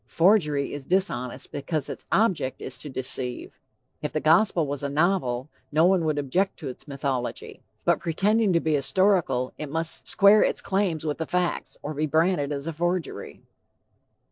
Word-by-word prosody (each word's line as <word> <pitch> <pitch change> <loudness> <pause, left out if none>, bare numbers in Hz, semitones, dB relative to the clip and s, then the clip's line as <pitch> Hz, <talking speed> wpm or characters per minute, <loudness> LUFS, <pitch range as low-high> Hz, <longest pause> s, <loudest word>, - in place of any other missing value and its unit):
Forgery 165 -6 +2
is 145 - -6
dishonest 155 -8 -1
because 145 0 -2
its - - -7
object 185 - +1
is 130 -3 -3
to 150 - -7
deceive. 130 -1 -3 0.4
If - - -3
the - - -1
Gospel 170 +1 +3
was 140 -1 -4
a 140 - -2
novel, 145 -5 0 0.2
no 155 +3 +4
one 180 -2 +3
would 155 -2 0
object 175 +8 0
to 150 -6 -6
its 130 +3 -11
mythology, 135 -3 -4 0.2
but - - +3
pretending 205 +5 +1
to 170 - +4
be 160 -1 0
historical, 150 -4 +2
it 150 - -5
must 165 +2 -3
square 205 +1 +6
its - - +1
claims 190 -5 -1
with 150 0 -2
the 160 - -3
facts, 180 -1 -2
or 150 - -4
be 155 +1 -1
branded 160 -1 +1
as 140 0 -4
a 165 - -3
forgery. 175 +2 -3
155 Hz, 170 wpm, -25 LUFS, 140-180 Hz, 0.4 s, square